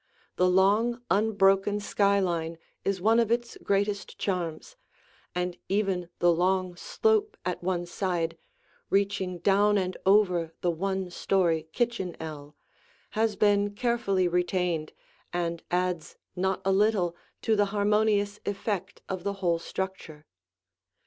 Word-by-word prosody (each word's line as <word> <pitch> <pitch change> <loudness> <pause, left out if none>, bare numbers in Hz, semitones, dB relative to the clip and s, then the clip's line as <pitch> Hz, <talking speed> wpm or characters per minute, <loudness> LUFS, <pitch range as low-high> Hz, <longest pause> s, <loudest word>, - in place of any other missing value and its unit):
The 180 0 +3
long, 205 +6 +3
unbroken 200 -1 +3
skyline 185 -5 +1 0.3
is 195 -1 0
one 220 +5 +4
of 230 -2 +2
its 235 0 0
greatest 200 0 -1
charms, 180 - -3 0.6
and 180 0 -2
even 195 -4 0
the 175 - +4
long 185 +1 +1
slope 435 - +1
at 180 -1 -2
one 175 -1 -1
side, 175 -2 -2 0.5
reaching 195 -2 0
down 205 +3 +3
and 185 -1 -1
over 180 -5 +3
the 175 - +2
one 190 +2 -2
story 170 -4 +1
kitchen 235 -7 -1
ell, 150 -2 -8 0.6
has 220 -1 +1
been 205 0 +2
carefully 225 -6 +1
retained 175 -2 0 0.4
and 170 -1 -2
adds 180 -2 -1 0.2
not 190 +1 -1
a 195 - +3
little 195 -3 +2 0.3
to 220 - +3
the 205 -1 +3
harmonious 205 0 +1
effect 195 -2 -3
of 185 -1 -4
the 200 - -1
whole 175 -4 0
structure. 180 -5 -6
190 Hz, 125 wpm, -28 LUFS, 175-205 Hz, 0.6 s, one